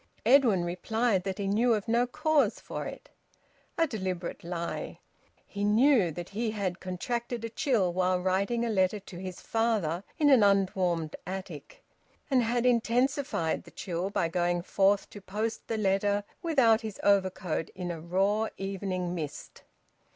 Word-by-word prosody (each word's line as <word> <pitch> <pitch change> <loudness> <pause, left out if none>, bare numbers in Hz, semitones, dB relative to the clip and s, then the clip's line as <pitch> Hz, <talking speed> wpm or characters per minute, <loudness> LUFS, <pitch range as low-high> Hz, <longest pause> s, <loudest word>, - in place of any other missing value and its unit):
Edwin 230 -8 +5
replied 195 +3 0
that 190 0 -3
he 200 - -3
knew 225 +4 +3
of 210 +1 -4
no 235 +2 +2
cause 310 +2 +1
for - - -5
it. - - -10 0.7
A 330 - +4
deliberate 185 - -4
lie! 170 0 -4 0.5
He 200 0 -5
knew 220 -1 +4
that 175 +3 -7
he 220 +3 -2
had 195 -4 -3
contracted 235 +6 -3
a - - -4
chill 220 - +1
while 185 0 +1
writing 200 +6 0
a - - -1
letter 190 0 +2
to 190 -2 -11
his 185 -1 -6
father 210 -7 0
in 295 -3 +4
an 260 -4 +7
unwarmed 185 -5 +2
attic, 195 - -7 0.5
and 260 -2 +4
had 240 +1 0
intensified 245 - +1
the - - -14
chill 180 0 -4
by 175 -4 0
going 175 +1 0
forth 195 +1 +2
to 205 - -10
post 215 +4 -4
the 225 - -2
letter 200 0 +1 0.2
without 260 -9 +4
his 215 -3 -7
overcoat 190 -4 +1
in 180 -2 -4
a 165 -2 -6
raw 195 +6 +1
evening 190 -2 -3
mist. 150 -4 -6
200 Hz, 155 wpm, -29 LUFS, 180-230 Hz, 0.7 s, an